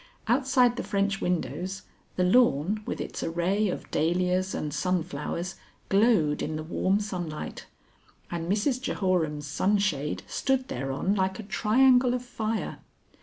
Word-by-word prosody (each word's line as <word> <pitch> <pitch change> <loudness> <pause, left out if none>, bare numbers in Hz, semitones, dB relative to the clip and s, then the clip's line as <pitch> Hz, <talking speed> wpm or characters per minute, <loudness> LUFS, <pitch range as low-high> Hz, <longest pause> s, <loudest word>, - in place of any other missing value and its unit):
Outside 250 0 +3
the - - -2
French 200 0 0
windows, 180 +2 -2 0.3
the 180 - +1
lawn 195 - +3
with - - -3
its - - -5
array 185 +5 0
of - - -5
dahlias 180 +4 +1
and 150 -1 -3
sunflowers 170 +1 -2 0.3
glowed 195 -8 +3
in 155 - -2
the 155 - -4
warm 185 +4 +1
sunlight, 175 -7 -5 0.6
and 170 +1 -2
Mrs 245 +5 +1
Jehoram's 170 - 0
sunshade 170 -1 0
stood 265 -1 -1
thereon 135 +9 -1
like 190 -1 0
a 220 - -6
triangle 250 +4 +4
of 250 0 -4
fire. 225 -2 -3
190 Hz, 130 wpm, -27 LUFS, 165-215 Hz, 0.6 s, triangle